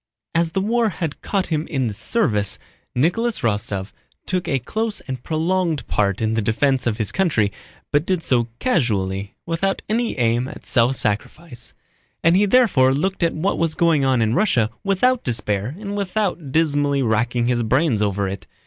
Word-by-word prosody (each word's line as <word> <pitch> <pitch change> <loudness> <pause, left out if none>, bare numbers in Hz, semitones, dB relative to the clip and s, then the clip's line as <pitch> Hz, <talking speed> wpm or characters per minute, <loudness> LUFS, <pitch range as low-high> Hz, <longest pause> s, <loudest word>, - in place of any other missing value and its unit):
As 165 0 +1
the 190 - +1
war 230 +2 +2
had 165 -5 -4
caught 195 -2 -1
him 155 +1 -1
in 135 -5 -1
the 110 - -2
service, 105 - 0 0.4
Nicholas 180 - +1
Rostóv 105 -4 -2 0.3
took 180 -1 -2
a 135 - +1
close 215 - -2
and 130 -3 -6
prolonged 165 0 0
part 100 0 0
in 110 0 +1
the 110 - +1
defense 130 +5 +1
of 110 -2 0
his 110 -3 -1
country, 150 - +1 0.4
but 145 +1 +3
did 180 -1 -1
so 120 -3 +2
casually, 100 - 0
without 170 +4 -1
any 230 -2 -1
aim 120 +1 +1
at - - -10
self 120 +2 +3
sacrifice, 120 +6 -3 0.5
and 165 +1 +5
he 205 +2 +4
therefore 175 - +4
looked 190 +7 -1
at 170 - +1
what 185 +6 -1
was 165 -1 0
going 165 -4 +3
on 130 -3 +3
in 110 0 +1
Russia 125 - +2
without 230 +6 +2
despair 110 +1 0
and 205 -1 -5
without 190 -6 -2
dismally 145 -3 +2
racking 120 +1 +1
his 120 -1 +1
brains 125 0 +2
over 100 -1 0
it. 100 +2 -6
140 Hz, 175 wpm, -21 LUFS, 115-185 Hz, 0.5 s, and